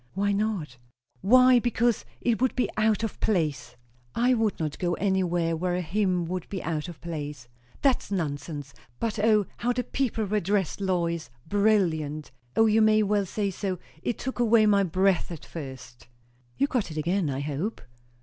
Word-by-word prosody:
"Why 200 +1 +1
not?" 200 - -2 0.4
"Why, 255 +3 +6
because! 240 -1 +1 0.2
It 235 -1 +1
would 260 - +2
be 250 - +1
out 215 0 +2
of 225 - -4
place." 160 -9 -1 0.4
"I 245 +2 +3
would 225 -4 0
not 155 -2 -3
go 175 -1 0
anywhere 175 -3 +1
where 175 +2 -1
a 180 - -1
hymn 180 0 0
would 180 +1 -4
be 195 -3 -4
out 155 -1 -2
of 170 -3 -9
place." 150 -6 -6 0.4
"That's 270 -6 +2
nonsense. 145 -5 -3 0.3
But 220 -2 -2
O, 210 -1 +4
how 245 +1 0
the 250 +1 -1
people 240 -3 -1
were 210 +2 +1
dressed, 195 0 -1
Lois! 170 -7 -1 0.2
Brilliant! 165 -8 +1 0.2
O 225 - +5
you 220 0 +4
may 215 0 +5
well 205 -1 +1
say 200 +1 -1
so. 190 0 -3 0.2
It 240 - -2
took 260 -1 -5
away 230 -2 +5
my 205 -1 +4
breath 185 0 +2
at 165 - -8
first" 130 -6 -9 0.5
"You - - +3
got 250 -9 -1
it 155 - -7
again, 170 +2 0
I 135 0 -2
hope?" 150 +10 -3
195 Hz, 175 wpm, -27 LUFS, 165-215 Hz, 0.5 s, Why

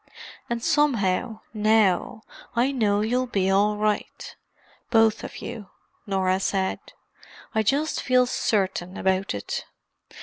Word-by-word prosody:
"And 235 -1 -2
somehow, 245 - +1
now, 215 -1 +2 0.3
I 245 +4 +2
know 210 -6 +1
you'll 250 +4 0
be 195 -5 0
all 205 +2 +3
right—both 220 +1 -1
of - - -8
you," 205 -4 -7 0.4
Norah 190 -1 +1
said. 190 -1 -1 0.7
"I 220 - +2
just 280 +8 0
feel 255 -2 +3
certain 190 -6 -1
about 190 - 0
it. 100 - -4
215 Hz, 110 wpm, -25 LUFS, 195-235 Hz, 0.7 s, all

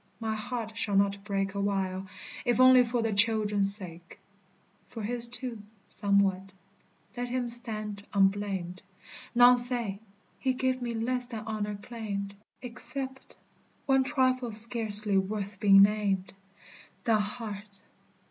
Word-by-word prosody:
My 220 -1 -3
heart 220 0 -6
shall 205 -3 -2
not 200 0 +1
break 195 -1 -3
Awhile, 195 -1 -2 0.4
if 245 0 0
only 255 0 +7
for 240 -1 -2
the 225 -1 -1
children's 205 -2 +4
sake. 175 -4 -10 0.7
For 225 - -8
his, 235 +2 +1
too, 245 -2 -6 0.3
somewhat. 195 -2 0 0.6
Let 245 0 -4
him 250 0 -2
stand 215 -4 0
unblamed; 195 -2 -1 0.5
None 245 +1 +7
say, 240 -5 +2 0.4
he 260 -1 0
gave 255 0 -2
me 240 -1 -4
less 245 +2 -1
than 230 -3 -7
honor 210 -1 -4
claimed, 200 -3 -6 0.3
Except 265 +2 -7 0.5
one 270 -1 +3
trifle 255 -3 0
scarcely 215 -2 +4
worth 200 0 -5
being 195 -1 +7
named 200 -2 0 0.7
The 225 -2 +2
heart. 205 -2 -7
215 Hz, 125 wpm, -28 LUFS, 200-245 Hz, 0.7 s, only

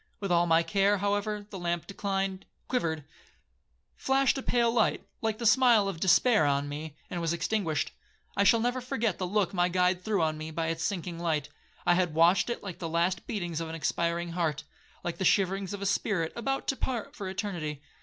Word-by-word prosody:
With 195 -2 -3
all 175 0 +4
my 165 0 +4
care, 200 +2 +2
however, 205 +1 -1
the 190 - -6
lamp 175 -1 -2
declined,—quivered,—flashed 195 - -3
a 270 - -3
pale 235 -2 +2
light, 240 - +1 0.2
like 220 -1 -1
the 235 - -4
smile 230 -3 +5
of 190 -5 -4
despair 195 +4 +4
on 140 0 +1
me, 150 +1 -6 0.2
and 175 - -3
was 165 0 0
extinguished. 170 -2 -1 0.4
I 200 - +3
shall 225 +3 +5
never 245 +2 0
forget 230 -5 -1
the 185 - -1
look 200 0 0
my 175 -1 +2
guide 180 0 +1
threw 205 -6 +1
on 155 -1 -1
me 155 +1 -5
by 160 +1 -2
its 165 0 -2
sinking 175 -1 -3
light. 155 -4 -1 0.4
I 175 - +5
had 175 -3 +1
watched 175 +6 +4
it 240 - -3
like 195 -4 -7
the 165 - -4
last 170 +2 0
beatings 175 -6 -3
of 165 - -4
an 165 - -5
expiring 170 +1 -1
heart, 160 -4 -1 0.4
like 170 -1 -4
the - - 0
shiverings 195 0 +2
of 200 -1 -5
a - - -2
spirit 195 -4 0
about 270 +4 -2
to 270 - +1
part 245 -4 -3
for 195 -2 -5
eternity. 175 -7 -4
185 Hz, 195 wpm, -29 LUFS, 165-205 Hz, 0.4 s, smile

